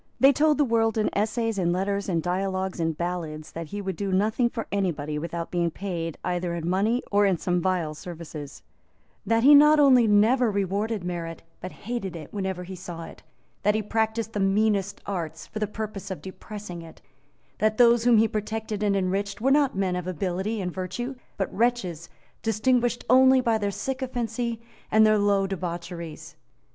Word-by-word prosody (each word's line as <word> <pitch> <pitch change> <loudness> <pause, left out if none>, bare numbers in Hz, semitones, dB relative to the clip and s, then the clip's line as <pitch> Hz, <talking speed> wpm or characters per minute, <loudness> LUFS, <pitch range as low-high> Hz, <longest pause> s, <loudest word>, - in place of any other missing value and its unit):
They 270 +1 +7
told 300 +2 +3
the 295 - +3
world 225 -2 +1
in 215 - +1
essays, 220 +1 0
in 175 -2 +1
letters, 200 +2 -1
in 170 -3 +1
dialogues, 190 +1 -2
in 165 -1 0
ballads, 160 -2 -4
that 165 -1 -6
he 205 +6 -5
would 190 -2 -3
do 200 +2 -3
nothing 215 +5 +2
for 230 -1 -5
anybody 155 -7 -1
without 170 +1 -5
being 175 -1 +1
paid 165 -3 -4
either 175 -1 -1
in 170 -1 -4
money 210 +7 +1
or 205 0 +4
in 190 -3 +2
some 180 +1 0
vile 175 -4 0
services; 155 -3 -9 0.6
that 225 0 +2
he 285 +3 +8
not 300 +1 +7
only 255 -5 +6
never 225 +4 +4
rewarded 200 +1 -1
merit, 170 -2 -5 0.2
but 185 - -7
hated 210 -5 -5
it 155 -3 -9
whenever 190 -3 -3
he 185 +1 -8
saw 175 -2 -7
it; - - -11 0.4
that 210 +1 +2
he 215 - 0
practised 220 +1 -1
the 210 - -2
meanest 200 0 +1
arts 165 -5 -4
for 215 - -7
the 215 - 0
purpose 210 -2 -6
of 190 - -5
depressing 190 -2 -8
it; 165 -1 -13 0.6
that 215 0 +2
those 235 -1 +5
whom 240 -2 +5
he 225 +1 +5
protected 215 0 -3
and 205 -1 +2
enriched 195 +1 -1
were 265 +5 +2
not 280 -7 +3
men 190 -2 0
of 180 0 -4
ability 190 +4 -2
and 180 -3 -3
virtue, 190 +8 -4 0.2
but 195 - -2
wretches 195 -8 0 0.3
distinguished 240 +2 +1
only 260 +1 +6
by 235 -3 +2
their 205 -1 0
sycophancy 240 -1 -3 0.3
and 220 0 +6
their 215 -1 +4
low 200 -1 +2
debaucheries. 175 -3 -6
200 Hz, 180 wpm, -26 LUFS, 180-225 Hz, 0.6 s, he